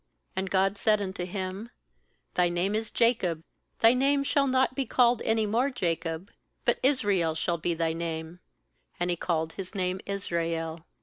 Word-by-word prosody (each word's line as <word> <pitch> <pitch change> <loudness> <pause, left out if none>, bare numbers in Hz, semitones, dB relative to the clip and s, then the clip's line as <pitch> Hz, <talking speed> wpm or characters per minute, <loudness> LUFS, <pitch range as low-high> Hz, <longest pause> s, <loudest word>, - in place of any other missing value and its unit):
IOAnd 190 0 -2
God 195 +1 +2
said 215 -1 +3
unto 190 -2 -3
him: 190 +4 -5 0.6
'Thy 180 -1 +3
name 175 +4 0
is 220 +1 -1
Jacob; 190 -9 +1 0.4
thy 225 +1 +7
name 275 +2 +2
shall 275 0 +2
not 260 0 +2
be 275 - 0
called 245 -1 +3
any 220 -1 +1
more 235 +6 +1
Jacob, 170 -6 -2 0.3
but - - +3
Israel 205 - +2
shall 170 +1 -1
be 170 +1 -1
thy 165 -1 0
name7; 165 +1 -5 0.6
and 175 - 0
He - - +1
called 160 -2 -1
his 195 +1 -7
name 185 0 -1
Israel. 170 -4 -2
190 Hz, 165 wpm, -28 LUFS, 170-225 Hz, 0.6 s, thy